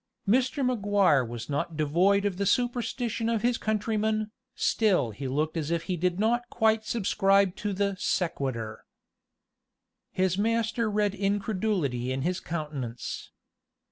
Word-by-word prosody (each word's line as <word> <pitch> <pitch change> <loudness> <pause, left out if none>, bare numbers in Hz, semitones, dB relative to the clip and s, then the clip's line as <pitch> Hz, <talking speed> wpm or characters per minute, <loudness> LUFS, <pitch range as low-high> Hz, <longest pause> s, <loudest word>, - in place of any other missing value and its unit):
Mr. 260 +5 +2
Maguire 205 - +3
was 120 0 -6
not 150 +2 -2
devoid 180 +7 +3
of 195 -3 -1
the 200 - 0
superstition 240 -1 0
of 230 -2 0
his 245 0 +2
countrymen, 215 0 0 0.2
still 185 - +2
he 130 +6 -5
looked 150 +5 -1
as 160 -2 -2
if 170 -1 0
he 185 - -2
did 180 +2 0
not 240 +3 +1
quite 220 -1 +2
subscribe 195 -3 +2
to 205 - -3
the 200 0 0
sequitur. 130 - -2 1.3
His 185 0 0
master 230 +1 +1
read 205 -1 +1
incredulity 195 - -1
in 130 0 -2
his 180 +3 0
countenance. 145 -8 -5
200 Hz, 135 wpm, -28 LUFS, 155-220 Hz, 1.3 s, Maguire